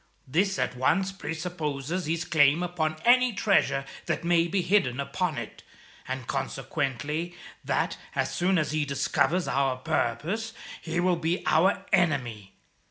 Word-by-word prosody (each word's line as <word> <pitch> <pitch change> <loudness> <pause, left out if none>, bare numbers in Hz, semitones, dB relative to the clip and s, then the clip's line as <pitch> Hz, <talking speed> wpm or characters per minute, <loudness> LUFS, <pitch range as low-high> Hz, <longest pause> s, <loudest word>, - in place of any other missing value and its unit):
This 190 +8 +1
at 125 - -1
once 185 +10 +1
presupposes 160 -2 -4
his 165 +1 -1
claim 155 +1 +4
upon 160 -3 -1
any 250 0 +5
treasure 140 -9 +2 0.2
that - - -1
may 170 0 +3
be 185 +1 0
hidden 170 -9 +2
upon 170 +3 -2
it, 115 -2 -7 0.5
and 130 -1 -4
consequently 145 +5 -3 0.3
that, - - 0 0.2
as - - 0
soon 185 +1 +2
as 155 -3 0
he 155 -1 +1
discovers 150 +5 +1
our 135 -2 +1
purpose, 160 - -1 0.3
he 165 +1 -2
will 180 0 +2
be 170 +3 -1
our 180 +6 +3
enemy. 120 - +1
160 Hz, 140 wpm, -27 LUFS, 140-180 Hz, 0.5 s, any